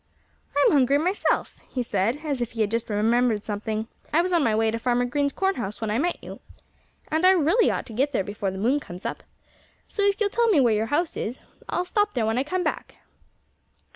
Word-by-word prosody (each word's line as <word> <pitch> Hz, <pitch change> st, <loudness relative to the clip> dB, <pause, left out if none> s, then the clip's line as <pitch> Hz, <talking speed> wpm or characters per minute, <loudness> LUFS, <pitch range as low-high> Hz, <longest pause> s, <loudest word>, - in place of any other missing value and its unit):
"I'm 285 Hz, -, +5 dB
hungry 275 Hz, -1 st, +4 dB
myself," 360 Hz, +7 st, 0 dB
he 250 Hz, -, -2 dB
said, 230 Hz, +8 st, -1 dB
as 280 Hz, -5 st, -2 dB
if 240 Hz, -, -3 dB
he 225 Hz, -, -2 dB
had 210 Hz, -1 st, +1 dB
just 230 Hz, 0 st, -1 dB
remembered 220 Hz, +1 st, +2 dB
something. 215 Hz, +1 st, -3 dB, 0.2 s
"I 330 Hz, +3 st, +3 dB
was 365 Hz, 0 st, -1 dB
on 335 Hz, -4 st, +3 dB
my 225 Hz, -4 st, +2 dB
way 220 Hz, 0 st, +2 dB
to 230 Hz, -, -3 dB
Farmer 245 Hz, +1 st, +1 dB
Green's 280 Hz, +3 st, 0 dB
corn 385 Hz, +4 st, 0 dB
house 210 Hz, -3 st, -4 dB
when 220 Hz, -2 st, -2 dB
I 220 Hz, -, +1 dB
met 350 Hz, +4 st, 0 dB
you. -, -, -9 dB, 0.7 s
And 315 Hz, +2 st, 0 dB
I 370 Hz, -, +7 dB
really 375 Hz, +5 st, +4 dB
ought -, -, -2 dB
to 230 Hz, -, -9 dB
get 270 Hz, +6 st, +1 dB
there 240 Hz, -, 0 dB
before 205 Hz, 0 st, -3 dB
the 190 Hz, -, -6 dB
moon 245 Hz, +9 st, +2 dB
comes 180 Hz, -8 st, -10 dB
up. -, -, -4 dB, 0.7 s
So 410 Hz, -, -3 dB
if 400 Hz, 0 st, +2 dB
you'll 410 Hz, -2 st, +1 dB
tell 470 Hz, +1 st, +2 dB
me 400 Hz, -9 st, +4 dB
where 240 Hz, -4 st, +4 dB
your 215 Hz, +1 st, 0 dB
house 315 Hz, +6 st, 0 dB
is 240 Hz, +5 st, -4 dB, 0.3 s
I'll 355 Hz, -, -1 dB
stop 415 Hz, 0 st, 0 dB
there 235 Hz, -3 st, +1 dB
when 225 Hz, +3 st, +1 dB
I -, -, +1 dB
come 365 Hz, +5 st, -2 dB
back." -, -, -3 dB
250 Hz, 230 wpm, -25 LUFS, 220-330 Hz, 0.7 s, I